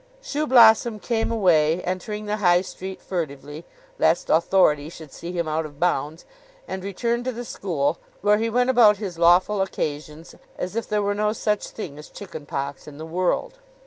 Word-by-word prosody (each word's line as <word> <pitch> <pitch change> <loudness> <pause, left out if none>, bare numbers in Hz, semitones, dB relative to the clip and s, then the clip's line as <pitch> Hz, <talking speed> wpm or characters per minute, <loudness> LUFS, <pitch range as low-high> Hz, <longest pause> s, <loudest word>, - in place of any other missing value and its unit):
Shoeblossom 235 -6 +4
came 225 +1 -1
away, 175 -6 +3
entering 210 +4 -4
the 210 0 -2
High 175 -3 +4
Street 190 0 -8
furtively, 150 -2 -5 0.3
lest 160 +2 +2
Authority 160 -3 +3
should 160 -3 -12
see 170 - -7
him 170 -2 -2
out 155 +1 -1
of 145 -2 -11
bounds, 160 -2 -1 0.4
and 190 - -5
returned 235 +5 -2
to 255 - -1
the 240 0 -7
school, 165 -8 -2 0.2
where 210 +1 +3
he 225 +1 0
went 250 +3 +2
about 220 -5 +6
his 190 -5 -6
lawful 180 +4 +4
occasions 155 -3 -4 0.2
as 185 +3 -5
if 230 - -3
there 210 -1 0
were 200 0 0
no 210 +1 0
such 210 -2 -1
thing 150 -9 -8
as 150 - -12
chicken 160 -7 -10
pox 140 +1 -5
in 145 -1 -10
the 160 - -7
world. 185 - -1
185 Hz, 175 wpm, -23 LUFS, 160-215 Hz, 0.4 s, about